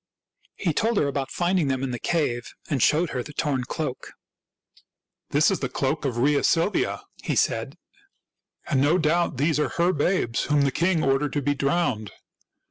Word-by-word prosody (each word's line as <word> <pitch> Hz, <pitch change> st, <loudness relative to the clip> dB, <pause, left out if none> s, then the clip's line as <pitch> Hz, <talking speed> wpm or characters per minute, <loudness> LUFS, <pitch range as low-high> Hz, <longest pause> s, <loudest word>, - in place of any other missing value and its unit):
He 170 Hz, -5 st, -1 dB
told 225 Hz, +7 st, +1 dB
her 145 Hz, -, +2 dB
about 140 Hz, -1 st, -2 dB
finding 175 Hz, -3 st, +1 dB
them 130 Hz, -1 st, -1 dB
in 135 Hz, -, -2 dB
the 120 Hz, -, -4 dB
cave, 125 Hz, -8 st, -1 dB, 0.2 s
and 140 Hz, -4 st, 0 dB
showed 160 Hz, +5 st, +3 dB
her 125 Hz, -, -2 dB
the 150 Hz, -, -9 dB
torn 135 Hz, -5 st, -1 dB
cloak. 150 Hz, -2 st, -5 dB, 0.5 s
" -, -, -35 dB
This 150 Hz, +6 st, +3 dB
is 190 Hz, -, -1 dB
the 130 Hz, -, -2 dB
cloak 140 Hz, +4 st, -1 dB
of 125 Hz, -4 st, -1 dB
Rhea 140 Hz, +4 st, +2 dB
Silvia," 170 Hz, +5 st, +1 dB, 0.2 s
he -, -, -1 dB
said; -, -, 0 dB, 0.5 s
" -, -, -33 dB
and 135 Hz, -5 st, +1 dB
no 150 Hz, +5 st, +4 dB
doubt 170 Hz, -3 st, +1 dB
these 150 Hz, +2 st, +1 dB
are 150 Hz, -, +1 dB
her 175 Hz, +2 st, +1 dB
babes 145 Hz, -7 st, 0 dB
whom 150 Hz, -1 st, +2 dB
the 140 Hz, -1 st, +2 dB
king 170 Hz, +2 st, +1 dB
ordered 135 Hz, +2 st, +1 dB
to 145 Hz, -, 0 dB
be 145 Hz, -, +1 dB
drowned. 140 Hz, -, 0 dB
145 Hz, 190 wpm, -25 LUFS, 135-170 Hz, 0.5 s, no